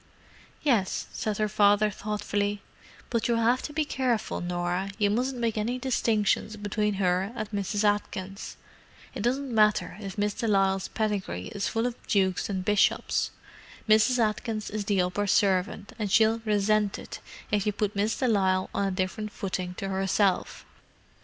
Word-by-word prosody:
"Yes," 225 -10 +1
said 215 -2 -2
her 215 - +1
father 205 0 +4
thoughtfully. 205 0 -2 0.5
"But 230 -2 +1
you'll 235 -1 +2
have 235 +3 +3
to - - -5
be 310 0 0
careful, 255 -6 -1
Norah; 175 +2 -2
you 205 -2 +2
mustn't 250 +4 0
make 230 -2 -1
any 235 +4 -1
distinctions 220 -4 0
between 210 0 -1
her 190 +1 +1
and 215 -2 -3
Mrs. 205 0 -1
Atkins. 205 -2 -2 0.6
It - - -5
doesn't 255 +3 -1
matter 215 -1 +3
if 195 -1 -7
Miss 205 0 +1
de 230 +2 -3
Lisle's 195 -2 +2
pedigree 200 - -2
is 200 - -2
full 225 +1 0
of 245 - 0
dukes 190 -3 +1
and 190 -2 -2
bishops—Mrs. 215 +3 +1
Atkins 215 -1 -1
is 210 -1 -3
the 195 -3 +2
upper 180 +3 -1
servant, 195 +1 +1
and 205 -3 -2
she'll 220 +2 +4
resent 210 -1 +2
it - - -8 0.3
if 210 -1 +1
you - - +3
put 205 0 -2
Miss 210 +3 0
de 255 - +1
Lisle 190 -4 +2
on 200 - 0
a - - 0
different 190 +3 -2
footing 185 -2 -4
to 195 - -4
herself." 195 0 0
205 Hz, 160 wpm, -27 LUFS, 195-220 Hz, 0.6 s, father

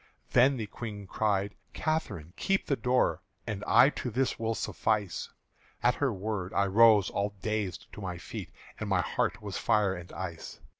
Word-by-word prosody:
Then 130 +2 +5
the 110 - -3
Queen 105 -1 -7
cried, 100 0 0 0.2
"Catherine, 100 - -2
keep 195 - 0
the 140 - +1
door, 125 +1 +1 0.2
And 105 -3 -4
I 140 - +7
to 125 - -4
this 130 +2 0
will 115 0 0
suffice!" 105 -6 -1 0.5
At 125 - +5
her 140 -1 0
word 100 -2 -3
I 100 - +3
rose 105 0 +6
all 100 +1 -1
dazed 105 -4 -2
to 105 - -8
my 90 -2 -4
feet, - - -7 0.3
And - - -3
my - - +3
heart - - -1
was - - -4
fire 105 -3 +2
and 85 -1 -8
ice. 85 -2 -6
105 Hz, 170 wpm, -30 LUFS, 95-120 Hz, 0.5 s, I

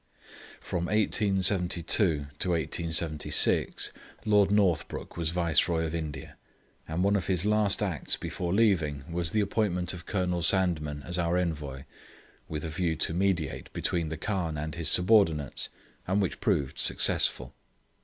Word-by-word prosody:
From 85 0 -3
1872 95 -4 +1 0.5
to 90 - 0
1876 80 -1 +1 0.3
Lord 105 -2 +4
Northbrook 100 -5 0
was 85 -2 -1
Viceroy 85 -1 +1
of 80 - -4
India, 80 -3 -6 0.5
and 80 +3 -1
one 100 +1 +2
of 95 - -1
his 95 -1 +1
last 105 -1 +2
acts 90 -8 -2
before 85 -1 -4
leaving 85 -10 +1
was 85 0 -1
the 110 - +1
appointment 95 -4 -1
of 85 -1 -10
Colonel 90 -3 -1
Sandeman 80 -6 +2
as 85 +1 -3
our 85 +1 +1
Envoy, 75 -6 -3 0.7
with 75 0 -4
a - - -4
view 80 +1 -1
to 80 - 0
mediate 90 -4 -1
between 85 -3 -1
the 80 - -5
Khan 90 -4 -2
and 75 +1 -4
his 85 -1 0
subordinates, 90 - +3 0.4
and 95 +3 +1
which 95 -3 -2
proved 70 -2 -1
successful. 65 0 +2
85 Hz, 140 wpm, -28 LUFS, 80-95 Hz, 0.7 s, Lord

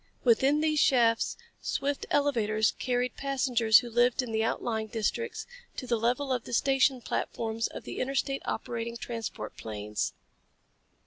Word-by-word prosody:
Within 270 +5 +4
these 310 -1 +2
shafts, 230 -5 +3 0.2
swift 280 +1 -2
elevators 225 -7 +2
carried 250 -1 0
passengers 250 -5 +3
who 240 - -7
lived 245 +3 +3
in 240 - -6
the 220 0 +1
outlying 220 -1 -1
districts 440 - -2 0.3
to 255 - -4
the 235 -2 0
level 250 +4 +1
of 245 -2 -2
the - - -7
station 270 0 +3
platforms 225 0 -2
of - - -9
the - - -6
interstate 275 +1 -1
operating 235 0 -3
transport 230 -1 -5
planes. 105 - -3
245 Hz, 140 wpm, -29 LUFS, 225-270 Hz, 0.3 s, Within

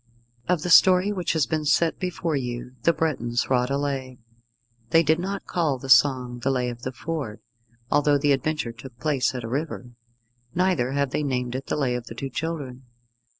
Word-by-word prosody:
Of 175 -3 +1
the 180 - -1
story 185 +3 +6
which 185 -4 -1
has 160 -4 +2
been 155 +5 -2
set 160 +2 +2
before 175 -3 -2
you 125 -2 -4
the 170 - +4
Bretons 125 -8 -1
wrought 125 0 +2
a 140 - 0
Lay. 135 -3 -3 0.7
They 165 +6 +5
did 160 +2 +2
not 195 +2 -4
call 155 -6 0
the 135 +1 -9
song 125 -1 +4
the 130 - -1
Lay 125 -2 0
of 120 0 -8
the 130 - -4
Ford, 135 -5 -5 0.5
although 145 0 +4
the 145 0 +2
adventure 140 -2 0
took 120 +1 -12
place 135 -3 0
at 125 - -4
a - - -4
river; 135 -1 -4 0.6
neither 175 -9 +1
have 140 -1 0
they - - -1
named 125 -4 -2
it 135 +1 -5
The - - -1
Lay 135 -4 0
of 120 -1 -4
the 115 - -8
Two 135 +3 -5
Children. 140 -4 -4
140 Hz, 195 wpm, -25 LUFS, 125-160 Hz, 0.7 s, story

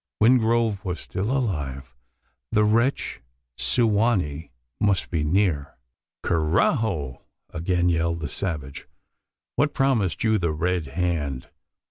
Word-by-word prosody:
Wingrove 115 -3 +3
was 90 -4 -3
still 100 +4 -3
alive: 70 - -2 0.6
the 105 - +3
wretch 115 - +1 0.3
Su 65 - +2
wa 110 +2 +3
nee 80 -4 -3 0.3
must 100 -2 +1
be 80 -4 0
near? 80 -3 0 0.5
"Carajo!" 80 - +1 0.3
again 90 +2 0
yelled 85 -1 +1
the 75 - -2
savage. 75 -4 -5 0.7
"What 145 +1 +2
promised 125 - +1
you 110 -1 +3
the 85 -3 0
Red 85 0 -1
Hand? 75 -4 -2
90 Hz, 115 wpm, -24 LUFS, 75-110 Hz, 0.7 s, Wingrove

